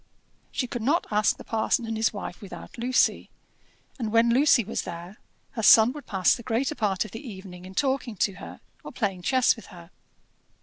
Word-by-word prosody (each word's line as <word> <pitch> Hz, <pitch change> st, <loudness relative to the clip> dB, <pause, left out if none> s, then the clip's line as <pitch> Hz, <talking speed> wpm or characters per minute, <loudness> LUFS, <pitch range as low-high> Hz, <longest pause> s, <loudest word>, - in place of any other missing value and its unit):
She 265 Hz, -, -2 dB
could 240 Hz, -1 st, -5 dB
not 290 Hz, +10 st, +1 dB
ask 210 Hz, 0 st, +2 dB
the -, -, -10 dB
parson 225 Hz, +1 st, 0 dB
and 225 Hz, 0 st, -3 dB
his 220 Hz, 0 st, +1 dB
wife 200 Hz, -4 st, -7 dB
without 200 Hz, -, -10 dB
Lucy; 250 Hz, +2 st, +1 dB, 0.7 s
and 220 Hz, -3 st, -2 dB
when 230 Hz, +1 st, +4 dB
Lucy 270 Hz, -1 st, +5 dB
was 215 Hz, -, -3 dB
there, 175 Hz, +3 st, -8 dB, 0.3 s
her 225 Hz, -, -4 dB
son 220 Hz, +2 st, +7 dB
would 290 Hz, +1 st, -10 dB
pass 190 Hz, -3 st, +3 dB
the -, -, -9 dB
greater 245 Hz, +5 st, -1 dB
part 205 Hz, -7 st, -1 dB
of 215 Hz, -, -10 dB
the 225 Hz, +7 st, -8 dB
evening 190 Hz, -3 st, -10 dB
in 190 Hz, +1 st, -11 dB
talking 265 Hz, -4 st, -1 dB
to 195 Hz, +1 st, 0 dB
her, -, -, -10 dB, 0.2 s
or -, -, -8 dB
playing 195 Hz, -6 st, -2 dB
chess 255 Hz, +7 st, +3 dB
with 225 Hz, -, -13 dB
her. 170 Hz, -3 st, -14 dB
225 Hz, 200 wpm, -26 LUFS, 195-245 Hz, 0.7 s, son